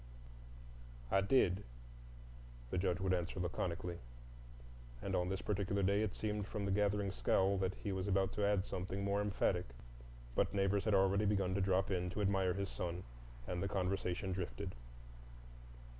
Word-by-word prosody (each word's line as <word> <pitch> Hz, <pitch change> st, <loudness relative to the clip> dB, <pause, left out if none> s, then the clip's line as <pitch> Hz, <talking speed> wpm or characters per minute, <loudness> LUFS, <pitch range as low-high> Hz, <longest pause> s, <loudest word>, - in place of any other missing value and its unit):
"I 95 Hz, -, +4 dB
did," 100 Hz, -3 st, +3 dB, 1.1 s
the 95 Hz, -, +1 dB
Judge 90 Hz, -1 st, +1 dB
would 95 Hz, -1 st, +1 dB
answer 90 Hz, +1 st, -1 dB
laconically; 90 Hz, -1 st, -2 dB, 1.0 s
and -, -, -2 dB
on 90 Hz, 0 st, +1 dB
this 95 Hz, 0 st, -2 dB
particular 100 Hz, -1 st, 0 dB
day 100 Hz, +2 st, +3 dB
it 110 Hz, -3 st, -1 dB
seemed 105 Hz, -2 st, -2 dB
from 105 Hz, -3 st, -3 dB
the 100 Hz, -, 0 dB
gathering 100 Hz, 0 st, +2 dB
scowl 95 Hz, 0 st, +2 dB
that 95 Hz, 0 st, 0 dB
he 105 Hz, -, -4 dB
was 95 Hz, 0 st, -2 dB
about 95 Hz, -1 st, +2 dB
to 105 Hz, -, -1 dB
add 100 Hz, -1 st, +2 dB
something 95 Hz, +2 st, -3 dB
more 100 Hz, +1 st, +1 dB
emphatic, 95 Hz, -3 st, +1 dB, 0.7 s
but 95 Hz, -, +1 dB
neighbors 100 Hz, +1 st, +2 dB
had 110 Hz, -2 st, +3 dB
already 95 Hz, +2 st, +3 dB
begun 100 Hz, -3 st, +2 dB
to 100 Hz, -, +1 dB
drop 95 Hz, +1 st, +2 dB
in 90 Hz, -1 st, 0 dB
to 105 Hz, -, -3 dB
admire 95 Hz, -2 st, +2 dB
his 100 Hz, -1 st, -2 dB
son, 90 Hz, +1 st, -4 dB, 0.4 s
and 90 Hz, +4 st, -3 dB
the 100 Hz, -, 0 dB
conversation 95 Hz, -1 st, -1 dB
drifted. 90 Hz, +1 st, -3 dB
95 Hz, 160 wpm, -37 LUFS, 90-100 Hz, 1.1 s, I